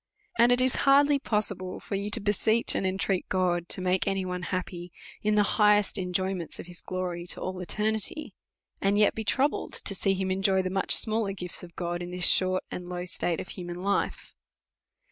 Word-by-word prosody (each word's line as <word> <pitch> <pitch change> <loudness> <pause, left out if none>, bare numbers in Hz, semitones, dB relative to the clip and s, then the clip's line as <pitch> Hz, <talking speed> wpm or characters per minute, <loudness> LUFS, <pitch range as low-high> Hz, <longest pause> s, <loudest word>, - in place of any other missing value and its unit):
And 240 +1 +6
it 245 - +4
is 255 0 +1
hardly 285 +1 +5
possible 205 -7 -3
for - - -8
you, 200 +1 -2
to - - 0
beseech 220 +3 +1
and 190 - 0
intreat 190 0 -1
God 175 -2 0
to - - +2
make 185 0 +1
any 195 -1 0
one 180 0 -4
happy 175 -1 -4 0.3
in 215 0 +1
the 210 - +5 0.2
highest 210 -1 +4
enjoyments 185 -1 -3
of - - -7
his 175 -1 -12
glory 180 -1 -4
to - - 0
all 185 0 -4
eternity, 215 - -1 0.5
and 200 +1 +2
yet 210 -1 +4
b^' 220 - -4
troubled 275 +6 0
to - - 0
see 195 0 +1
him 190 0 -2
enjoy 190 0 +2
the 185 - -3
much 190 0 +3
smaller 215 -2 +2
gifts 180 -2 -5
of 170 -1 -12
God 175 0 -3
in 175 - -5
this 180 0 +3
short 185 0 +3
and 180 0 -6
low 180 0 -4
state 175 -1 -2
of - - -7
human 175 -1 -7
life. 200 0 -1
190 Hz, 200 wpm, -27 LUFS, 180-210 Hz, 0.5 s, And